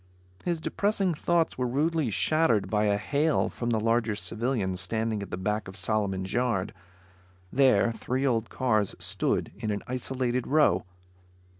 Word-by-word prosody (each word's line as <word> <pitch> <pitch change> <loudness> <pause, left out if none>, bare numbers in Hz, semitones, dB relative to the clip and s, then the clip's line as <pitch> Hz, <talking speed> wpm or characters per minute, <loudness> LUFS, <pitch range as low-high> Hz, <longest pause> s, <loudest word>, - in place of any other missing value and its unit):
His 170 -2 -1
depressing 200 +1 0
thoughts 165 -1 0
were 125 - +1
rudely 150 +2 +1
shattered 120 - +2
by 105 0 +2
a 100 -1 +2
hail 145 +8 +1
from 120 - -4
the 115 -2 +2
larger 115 0 +1
civilian, 110 -3 -2
standing 110 +3 -2
at 100 - -6
the - - -4
back 105 +3 -2
of 95 - -9
Solomon's 95 0 -1
yard. 120 -6 0 0.8
There, 125 -4 +4
three 130 +4 -2
old 115 -4 +1
cars 110 -6 +1
stood - - -1
in 110 -2 -3
an 105 -1 -2
isolated 125 0 -2
row. 145 - +3
115 Hz, 150 wpm, -28 LUFS, 105-135 Hz, 0.8 s, There